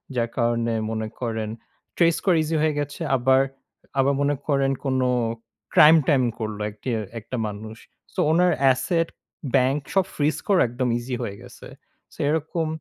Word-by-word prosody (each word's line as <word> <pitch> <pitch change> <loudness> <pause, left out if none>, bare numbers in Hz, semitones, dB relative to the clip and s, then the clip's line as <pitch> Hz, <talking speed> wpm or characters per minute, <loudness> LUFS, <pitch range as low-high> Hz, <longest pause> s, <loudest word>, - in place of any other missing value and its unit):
যার 120 -1 0
কারণে 115 -1 +1 0.2
মনে 110 0 -2
করেন 110 -3 -3 0.5
trace 170 -1 +3
করা 180 -4 +4
easy 160 +1 -2
হয়ে 155 -1 +2
গেছে। 145 0 -5
আবার 130 +1 +4 0.6
আবার 135 +1 +3
মনে 145 +1 +2
করেন 140 -2 +2
কোন 130 -1 +1 0.7
crime 160 -1 +8
time 130 -4 +3
করল 110 -2 -4
একটি 105 +5 -7 0.3
একটা 115 +4 -6
মানুষ। 110 +2 -8 0.4
So, - - -5
ওনার 180 +2 +4 0.2
asset 165 +5 0 0.5
ব্যাংক 135 +2 +3
সব 195 -2 +3
freeze 150 +1 0
করা 195 -3 +4
একদম 125 +2 -2
easy 125 +1 -4
হয়ে 100 - -5
গেছে। - - -12 0.5
So, - - -18
এরকম 160 +1 -1
135 Hz, 155 wpm, -24 LUFS, 115-155 Hz, 0.7 s, crime